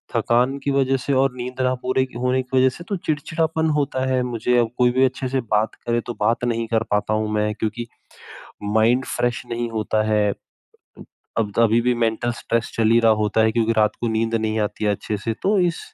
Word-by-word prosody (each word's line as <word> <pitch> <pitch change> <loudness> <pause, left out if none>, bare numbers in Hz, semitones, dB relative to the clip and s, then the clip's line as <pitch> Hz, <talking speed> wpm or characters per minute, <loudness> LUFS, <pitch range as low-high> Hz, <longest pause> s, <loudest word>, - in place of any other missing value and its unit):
थकान 125 +4 +2
की 140 - 0
वज़ह 135 -1 +2
से 135 +2 -2
और 135 0 +2
नींद 125 +1 -5
न 130 0 +2
पूरे 130 +1 +1 0.2
होने 125 +1 +1
की 130 +1 -2
वज़ह 130 0 +5
से 175 - -9
तो 200 - -2
चिड़चिड़ापन 160 +1 0
होता 135 -2 -1
है 130 -1 +1
मुझे 120 0 0
अब 115 - +1
कोई 125 -1 +4
भी 130 +1 +2
अच्छे 130 0 -2
से 135 -1 0
बात 110 -1 0
करे 120 0 0
तो 120 - -3
बात 115 +1 +1
नहीं 115 -1 -1
कर 115 -1 +1
पाता 105 +1 +1
हूँ 110 0 0
मैं 105 0 0
क्योंकि 115 +2 -3 0.8
माइंड 110 +5 +2
फ्रेश 120 -1 -1
नहीं 120 0 -2
होता 110 0 0
है। 105 -1 +2 1.1
अब 105 -2 -1
अभी 115 0 +4
भी 125 0 +2
मेंटल 115 +1 0
स्ट्रेस 115 0 -1
चल 110 -1 +2
ही 115 - +5
रहा 115 -1 +5
होता 105 +1 +1
है 110 - +2
क्योंकि 115 -1 +1
रात 105 -1 +2
को 120 - -1
नींद 115 +1 -1
नहीं 110 0 -1
आती 105 +1 -2
है 105 - +3
अच्छे 105 +1 -3
से 115 +2 -3
तो 200 +2 +2
इस 175 -2 0
120 Hz, 220 wpm, -22 LUFS, 110-130 Hz, 1.1 s, वज़ह